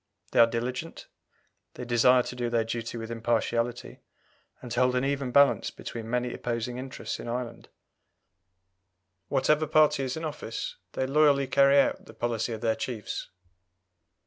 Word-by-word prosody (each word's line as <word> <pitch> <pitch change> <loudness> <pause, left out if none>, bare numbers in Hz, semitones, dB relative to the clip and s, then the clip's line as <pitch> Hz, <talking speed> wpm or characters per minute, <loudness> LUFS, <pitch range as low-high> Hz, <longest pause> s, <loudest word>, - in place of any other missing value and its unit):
They - - +2
are 115 - +8
diligent; 125 +7 -4 0.7
they 125 - -6
desire 125 +1 +4
to 125 - -7
do 120 -1 -2
their 115 -1 +1
duty 115 +1 -4
with 115 0 -6
impartiality, 115 +1 -1 0.6
and 125 - -10
to 120 - -1
hold 125 0 +3
an 125 +1 +1
even 140 -2 -1
balance 140 +2 +4
between 115 -1 -8
many 125 0 -1
opposing 120 +1 -3
interests 130 +1 -6
in - - -7
Ireland. 120 -1 -5 1.6
Whatever 150 +3 +2
party 155 -2 +4
is 130 +2 -3
in 160 - -4
office, 145 -6 -5 0.2
they 130 - -1
loyally 140 0 +4
carry 140 +1 +5
out - - +1
the 110 - -13
policy 115 0 -2
of 110 -1 -5
their 115 -2 +2
chiefs. 115 -5 -5
125 Hz, 155 wpm, -28 LUFS, 115-135 Hz, 1.6 s, are